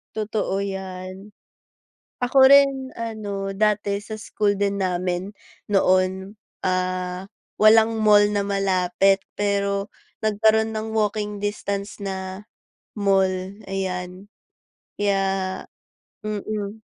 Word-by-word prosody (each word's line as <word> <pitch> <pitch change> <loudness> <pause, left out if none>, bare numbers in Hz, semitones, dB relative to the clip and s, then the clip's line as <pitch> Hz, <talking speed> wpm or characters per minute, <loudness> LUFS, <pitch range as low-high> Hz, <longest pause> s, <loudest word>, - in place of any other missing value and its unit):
Totoo 210 -2 -1
'yan. 190 0 -6 0.9
Ako 245 +2 0
rin, 275 -1 +5
ano, 210 -4 -4
dati 205 -1 +1
sa 215 +2 -8
school 210 -1 -1
din 200 0 -1
namin 185 +1 -2 0.4
noon, 190 +1 +2 0.2
ah, 185 0 -2 0.3
walang 220 +1 +5
mall 210 -1 +6
na 205 -1 -1
malapit 195 0 +2
pero 200 0 -1 0.3
nagkaroon 220 +1 +3
ng 220 0 -4
walking 210 -1 -1
distance 200 0 -3
na 190 0 -6 0.5
mall, 195 -2 +3 0.4
ayan. 185 0 -4 0.7
Kaya 200 -1 +2 1.0
mm. 215 0 -4
200 Hz, 90 wpm, -23 LUFS, 190-215 Hz, 1.0 s, mall